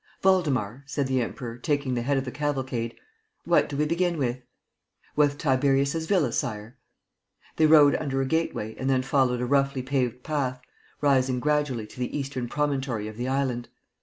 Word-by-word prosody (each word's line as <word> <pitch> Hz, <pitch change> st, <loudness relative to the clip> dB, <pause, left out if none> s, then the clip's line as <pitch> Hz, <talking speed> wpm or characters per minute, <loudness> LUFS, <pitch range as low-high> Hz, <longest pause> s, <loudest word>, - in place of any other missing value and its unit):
"Waldemar," 140 Hz, -, +2 dB
said 140 Hz, 0 st, -1 dB
the 130 Hz, -1 st, +1 dB
Emperor, 120 Hz, 0 st, -5 dB
taking 145 Hz, -2 st, 0 dB
the 120 Hz, -, 0 dB
head 140 Hz, +3 st, +1 dB
of 135 Hz, -, -1 dB
the 125 Hz, -, -4 dB
cavalcade, 130 Hz, -5 st, -2 dB, 0.5 s
"what 170 Hz, -, +3 dB
do 140 Hz, -, -4 dB
we 150 Hz, -, +2 dB
begin 170 Hz, +2 st, 0 dB
with?" 130 Hz, -3 st, -1 dB, 0.7 s
"With 145 Hz, -1 st, +3 dB
Tiberius's 140 Hz, +2 st, +1 dB
Villa, 175 Hz, -, +2 dB
Sire." 115 Hz, -3 st, -3 dB, 0.8 s
They 155 Hz, -, +5 dB
rode 150 Hz, -2 st, +7 dB
under 135 Hz, -3 st, -1 dB
a 135 Hz, -, +1 dB
gateway 145 Hz, -8 st, -1 dB
and 130 Hz, -, -2 dB
then 130 Hz, -1 st, +2 dB
followed 125 Hz, -2 st, +1 dB
a -, -, 0 dB
roughly 135 Hz, 0 st, +1 dB
paved 125 Hz, -2 st, -1 dB
path, 135 Hz, -5 st, -1 dB, 0.4 s
rising 130 Hz, -3 st, +2 dB
gradually 145 Hz, -5 st, 0 dB
to 115 Hz, -, -14 dB
the 125 Hz, +3 st, -2 dB
eastern 135 Hz, -3 st, -3 dB
promontory 135 Hz, -6 st, -1 dB
of 110 Hz, -, -8 dB
the 120 Hz, +3 st, -3 dB
island. 130 Hz, -3 st, -1 dB
135 Hz, 170 wpm, -26 LUFS, 125-145 Hz, 0.8 s, rode